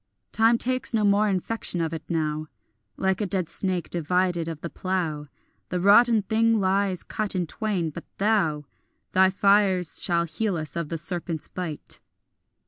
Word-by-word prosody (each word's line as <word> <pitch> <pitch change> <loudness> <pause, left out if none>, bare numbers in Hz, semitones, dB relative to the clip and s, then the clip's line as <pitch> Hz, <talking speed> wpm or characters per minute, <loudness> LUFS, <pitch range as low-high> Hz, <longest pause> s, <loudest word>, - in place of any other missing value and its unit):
Time 225 +2 +4
takes 255 0 +2
no 215 - +2
more 205 +1 +3
infection 190 0 -2
of 165 -1 -1
it 160 - -4
now; 155 -2 -1 0.5
Like 190 +1 0
a 205 - 0
dead 185 -3 0
snake 185 -3 -2
divided 175 0 0
of 160 -2 -6
the 170 - -4
plough, 170 -6 -2 0.4
The 180 - -1
rotten 215 +3 +5
thing 225 +2 +2
lies 190 -1 +1
cut 210 -2 -3
in 180 -1 0
twain; 185 -3 -2
but 170 - -9
thou, 195 -8 +1 0.5
Thy 190 0 +5
fires 195 -3 +2
shall 170 -1 +2
heal 185 +3 -2
us 155 -1 -4
of 170 -3 -3
the 165 - -3
serpent's 170 -1 -3
bite. 170 -5 -6
185 Hz, 160 wpm, -25 LUFS, 165-205 Hz, 0.5 s, rotten